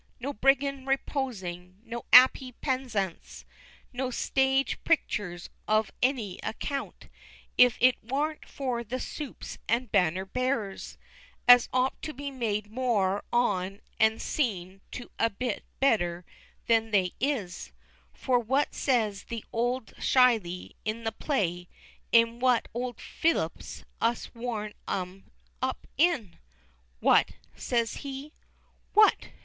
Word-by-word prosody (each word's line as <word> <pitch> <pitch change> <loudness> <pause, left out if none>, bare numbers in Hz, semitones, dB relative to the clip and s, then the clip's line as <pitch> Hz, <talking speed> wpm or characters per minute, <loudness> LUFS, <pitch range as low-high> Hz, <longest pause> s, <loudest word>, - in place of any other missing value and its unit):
no 275 +4 -4
briggands 270 +2 +1
reposin', 190 -10 -3
no 235 0 -6
'appy 255 0 +7
pezzants, 240 - -3 0.5
and 245 - -18
no 260 -1 0
stage 265 +2 +1
picturs 190 - -1 0.2
of 215 0 +2
any 240 -8 0
account, 275 +5 -5 0.5
if 250 -1 +6
it 255 0 +4
warn't 290 +6 -2
for 250 -4 -3
the 245 +3 -4
supes 295 0 -7
and 235 +1 0
banner 185 -1 +2
bearers, 230 -2 -3 0.5
as 245 -1 +8
ought 255 +1 0
to 310 - -5
be 280 +1 -5
made 215 -5 -2
more 215 -6 +1
on 195 -5 0 0.2
and 220 0 +4
seen 195 -8 -2
to 245 - -8
a 230 - +3
bit 230 +2 -3 0.2
better 175 -10 +1 0.4
than 225 -1 +3
they 190 -4 +2
is; 245 -10 -2 0.4
for 250 -2 +1
what 265 +5 0
says 220 -7 0
the 230 -2 -6
old 245 +1 -1
Shyley, 225 -9 +2
in 220 +2 -3
the 225 - -1
play, 180 - -1 0.4
'im 230 0 +4
what 250 -2 +3
old 245 +1 -3
Phellups 330 0 -2 0.2
us'd 230 +1 0
to 235 - -16
warm 220 -3 -3
'em 185 0 -4 0.3
up 260 0 -2
in? 275 - +1 0.6
"What?" - - +4 0.2
says 235 -2 -1
he, 280 +2 -7 0.6
"what! 425 0 +5
235 Hz, 125 wpm, -28 LUFS, 205-260 Hz, 0.6 s, as